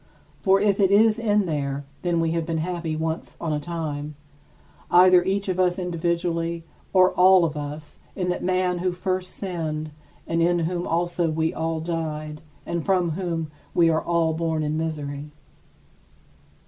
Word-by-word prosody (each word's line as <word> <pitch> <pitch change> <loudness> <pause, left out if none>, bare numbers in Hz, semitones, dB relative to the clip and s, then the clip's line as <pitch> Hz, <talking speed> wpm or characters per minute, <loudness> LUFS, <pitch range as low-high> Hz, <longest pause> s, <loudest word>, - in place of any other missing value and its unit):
For 195 0 +4
if 205 0 +2
it 195 -2 +4
is 215 +3 +4
in 210 -3 +2
there, 140 -3 -2 0.2
then 175 -2 0
we 165 -1 +1
have 165 0 0
been 165 0 -2
happy 170 -1 -2
once 160 +1 -4
on 160 -2 -2
a 150 - 0
time 150 -2 -4 0.7
either 180 0 +6
each 195 +2 -1
of 185 -1 -1
us 180 0 +2
individually 170 -1 -1 0.3
or 185 -1 +5
all 185 -1 +6
of 155 -2 -3
us 150 +1 -7 0.2
in 180 -2 -2
that 180 - -2
man 185 -1 +1
who 180 0 0
first 185 0 -2
sinned 155 -5 -4 0.3
and 165 0 0
in 175 +1 +3
whom 175 +1 -2
also 170 0 0
we 160 +1 0
all 160 0 -2
died 155 -2 -4 0.2
and 170 -1 -2
from 180 -3 +1
whom 165 -2 -3 0.2
we 165 -1 +5
are 160 - +1
all 170 -2 +1
born 160 -1 -1
in 150 +1 -1
misery. 150 -2 -4
170 Hz, 165 wpm, -24 LUFS, 160-180 Hz, 0.7 s, either